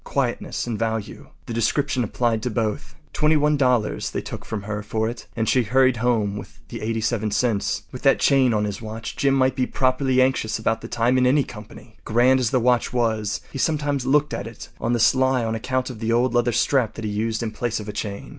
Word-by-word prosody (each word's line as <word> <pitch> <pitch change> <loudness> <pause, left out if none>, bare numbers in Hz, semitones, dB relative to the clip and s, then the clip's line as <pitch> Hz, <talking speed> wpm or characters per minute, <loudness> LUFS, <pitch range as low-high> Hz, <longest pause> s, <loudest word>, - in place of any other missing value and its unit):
Quietness 130 -4 -2
and 115 -3 -3
value—the 115 +1 -5
description 130 +3 0
applied 115 0 0
to 125 - -2
both. 105 -10 -3 0.2
Twenty 155 +1 +3
one 150 0 +2
dollars 125 -6 +1
they - - -3
took - - -7
from 105 -2 -5
her 105 0 -4
for 110 +1 -2
it, 120 +1 -7
and 110 -1 -1
she 130 - +3
hurried 130 +2 +3
home 110 -4 0
with - - -10
the - - -7
87 110 0 -1
cents. 105 0 0
With - - -8
that - - +4
chain 135 -3 +4
on 105 -2 +1
his 105 0 -4
watch 110 0 -6
Jim 140 -1 +2
might 130 -1 +2
be 130 - 0
properly 130 0 +1
anxious 130 -4 +1
about 115 0 -1
the 115 - -7
time 120 +2 +1
in 125 - +3
any 140 +2 +4
company. 110 0 -12
Grand 125 +4 +3
as 125 -3 +1
the 130 - +2
watch 125 0 +2
was, 110 -4 -1
he 135 - -6
sometimes 145 -3 0
looked 145 +3 +2
at 100 - -4
it 115 - -10
on 115 - 0
the 120 - +1
sly 130 0 +3
on 110 - -1
account 130 +3 -2
of 115 - -10
the 115 0 -1
old 120 +1 +2
leather 120 0 +2
strap 120 0 +1
that 115 - -6
he 105 - -2
used 110 +2 -1
in 110 - -3
place 115 +1 -2
of 105 - -8
a 105 - -5
chain. 100 -2 -5
120 Hz, 225 wpm, -23 LUFS, 110-130 Hz, 0.2 s, that